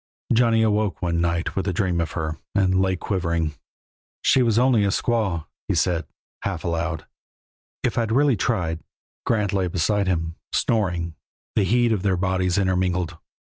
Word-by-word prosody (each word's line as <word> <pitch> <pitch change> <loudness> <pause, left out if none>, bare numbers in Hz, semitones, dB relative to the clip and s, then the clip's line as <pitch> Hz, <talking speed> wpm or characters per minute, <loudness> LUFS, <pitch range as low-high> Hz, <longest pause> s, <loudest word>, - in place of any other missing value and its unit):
Johnny 115 -1 +4
awoke 105 -2 +1
one 85 -1 +1
night 85 0 -1
with 95 0 -1
a 95 - 0
dream 90 -2 0
of 85 - -3
her, 80 -2 -3 0.2
and 95 -2 +3
lay 95 -1 +2
quivering. 85 -4 -1 0.7
"She 130 - +4
was 115 -3 +2
only 120 -3 +4
a - - +2
squaw," 100 -5 0 0.2
he - - 0
said, 85 -4 +1 0.3
half - - -3
aloud. 85 -1 -2 0.8
"If - - +1
I'd 115 -2 0
really 140 +1 +4
tried 90 -6 -1 0.2
" - - -83
Grant 105 -4 +1
lay 95 -2 +1
beside 95 +3 +1
him, 80 -2 -1 0.2
snoring, 90 -7 0 0.4
the 100 - +3
heat 120 +3 +3
of 105 -4 +1
their 95 -2 +1
bodies 95 0 +1
intermingled. 90 -3 0
95 Hz, 165 wpm, -23 LUFS, 85-105 Hz, 0.8 s, Johnny